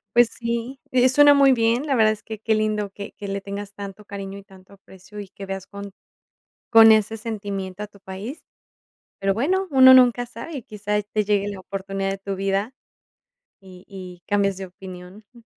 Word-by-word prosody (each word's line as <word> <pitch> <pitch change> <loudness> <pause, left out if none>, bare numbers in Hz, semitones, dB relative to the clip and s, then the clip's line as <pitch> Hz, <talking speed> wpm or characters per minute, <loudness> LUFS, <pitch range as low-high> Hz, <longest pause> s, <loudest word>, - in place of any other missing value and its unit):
Pues 240 -1 +6
sí, 235 +2 -4
eh, 255 0 +4
suena 290 +2 +6
muy 275 -1 +5
bien, 235 +2 +1
la 275 -3 0
verdad 215 -2 +4
es 215 - -6
que, 220 -1 -8
qué 220 - +1
lindo 215 -1 -1
que 200 +1 -9
que 200 - -8
le 195 0 -2
tengas 200 +1 -7
tanto 200 +1 -9
cariño 200 -1 -7
y 200 - -11
tanto 190 0 -18
aprecio, 195 +1 -12
y 195 - -11
que 195 0 -10
veas 195 0 -6
con 200 0 -9 0.8
con 225 -1 +9
ese 220 0 +2
sentimiento 200 -3 -5
a - - -6
tu 200 -1 -20
país. 195 - -8 0.8
Pero 195 0 +1
bueno, 370 - 0
uno 260 -1 +8
nunca 245 -1 +4
sabe 245 +6 -8
y - - -6
quizá 210 0 -3
te 210 +1 -2
llegue 205 0 +1
la 200 -2 -6
oportunidad 195 0 -4
de 195 - -4
tu 195 0 -5
vida, 195 +5 -1 0.9
y 185 0 -15
y 185 -3 -10
cambias 200 -2 +1
de 195 - -6
opinión, 185 +2 -12
jum, 240 -2 -19
205 Hz, 195 wpm, -23 LUFS, 195-230 Hz, 0.9 s, con